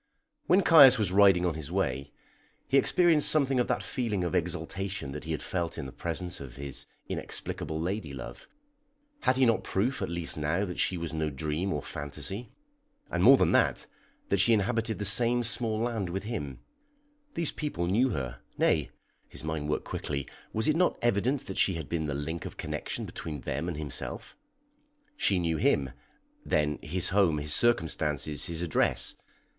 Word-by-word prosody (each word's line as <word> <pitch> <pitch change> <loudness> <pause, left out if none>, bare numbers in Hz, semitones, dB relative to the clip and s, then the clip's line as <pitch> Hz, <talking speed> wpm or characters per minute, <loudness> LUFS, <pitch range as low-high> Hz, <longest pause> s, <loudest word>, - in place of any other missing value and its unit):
When 190 +2 +5
Caius 140 -7 +9
was 105 -5 0
riding 95 -2 +5
on 85 - +1
his 80 0 -7
way, 70 -8 -1 0.6
he 135 - +5
experienced 165 -3 +4
something 135 -4 +2
of 125 - +1
that - - -1
feeling 115 -8 -2
of 85 - -2
exaltation 90 -1 -2
that 75 +2 -7
he 80 - -4
had 80 - -3
felt 85 -2 -3
in - - -4
the 65 - -7
presence 85 +4 -5
of 65 -3 -9
his 70 0 -4 0.2
inexplicable 80 0 -3
lady 90 -1 -3
love. 65 -2 -9 0.7
Had 130 - +2
he 130 - +5
not 115 -4 +2
proof 120 +8 -1
at - - -2
least 85 -2 -3
now 80 +7 0
that 90 -2 -6
she 90 - +1
was 85 -1 -5
no 80 -1 -1
dream 75 +6 -2
or 75 - -2
phantasy, 75 - -6 0.6
and - - 0
more - - +9
than - - +3
that, - - +2 0.4
that - - +2
she 115 - +5
inhabited 115 +1 0
the 105 - -2
same 120 +4 +3
small 115 -1 0
land 115 -6 -1
with 95 +3 -3
him? 100 - -5 0.7
These 165 -3 0
people 145 - -3
knew 115 +9 +2
her; 65 - -4 0.2
nay - - +2 0.4
(his - - -8
mind 80 -1 -3
worked 75 - -1
quickly), 70 -2 -4 0.2
was 110 - 0
it 155 - +3
not 180 +1 +2
evident 120 +4 +1
that 95 - -5
she 95 - +3
had 80 -4 -5
been 80 -2 -2
the 70 - -2
link 80 +3 -4
of - - -11
connection - - -4
between 75 -4 -6
them - - -3
and - - -3
himself? 75 -3 -5 0.8
She 100 - +2
knew 85 -2 0
him, 70 -3 +2 0.5
then 75 -1 0
his 90 +3 0
home, 95 -6 +3
his 75 0 0
circumstances, 75 - +1
his 85 0 -3
address. 80 -5 +1
90 Hz, 180 wpm, -29 LUFS, 75-115 Hz, 0.8 s, Caius